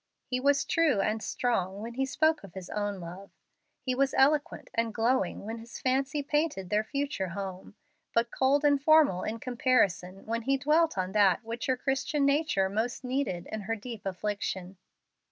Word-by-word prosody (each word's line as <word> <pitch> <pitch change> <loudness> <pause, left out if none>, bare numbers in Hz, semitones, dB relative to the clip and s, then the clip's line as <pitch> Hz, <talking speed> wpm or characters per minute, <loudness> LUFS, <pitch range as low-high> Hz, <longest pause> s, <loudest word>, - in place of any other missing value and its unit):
He 250 - -2
was 280 +2 +3
true 320 - +2
and 215 +2 0
strong 195 -3 -1
when 235 +1 -6
he 265 +2 -1
spoke 315 +1 +2
of 195 -2 -12
his 185 -2 -8
own 205 -2 -2
love. 180 +3 -9 0.5
He 255 - 0
was 270 +1 +1
eloquent 290 +2 +2
and 230 0 0
glowing 230 -5 0
when 225 +2 -5
his 230 +1 -9
fancy 270 +3 0
painted 290 - -1
their 210 +1 +2
future 280 -5 -2
home, 190 +2 -6 0.4
but 235 0 +2
cold 280 +3 +2
and 285 -1 +4
formal 300 - +5
in 220 - -3
comparison 215 -8 +1
when 230 +1 -2
he 275 +4 +1
dwelt 305 0 +2
on 185 0 -1
that 200 0 +3
which 230 +5 -5
her 260 -1 +1
Christian 275 +2 0
nature 280 -9 +2
most 220 +7 -2
needed 250 -9 -2
in 220 - -3
her 225 +3 -2
deep 225 0 -8
affliction. 195 -1 -3
235 Hz, 175 wpm, -29 LUFS, 195-275 Hz, 0.5 s, formal